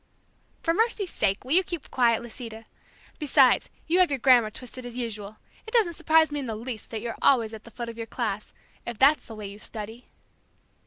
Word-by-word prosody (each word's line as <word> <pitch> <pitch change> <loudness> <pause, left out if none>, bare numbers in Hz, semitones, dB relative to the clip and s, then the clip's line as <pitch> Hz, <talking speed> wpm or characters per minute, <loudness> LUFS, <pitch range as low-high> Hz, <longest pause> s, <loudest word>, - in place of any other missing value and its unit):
"For 330 - +2
mercy's 430 -2 0
sake, 200 +2 0
will 260 - -6
you 365 +4 +6
keep 345 -5 -6
quiet, 235 -2 +3
Lisita? 225 -1 -9 0.5
Besides 275 -4 +4 0.2
you 345 +3 +2
have 365 - +5
your 280 - 0
grammar 245 -3 +5
twisted 250 +3 -8
as 245 0 -7
usual. 215 -3 -5 0.3
It 445 - -8
doesn't 410 -8 +4
surprise 320 -1 +3
me 295 - -2
in 270 - -4
the 220 - -3
least 225 0 -6
that 220 -2 -4
you're 235 0 -5
always 230 -5 +4
at 220 -1 -9
the - - -11
foot 235 +1 -6
of 230 - -7
the 230 -1 -5
class, 215 -4 -3 0.3
if 235 -2 -6
that's 275 +3 +4
the 225 - -8
way 210 -1 -7
you 200 +1 -8
study." 220 +3 -8
240 Hz, 210 wpm, -26 LUFS, 220-290 Hz, 0.5 s, you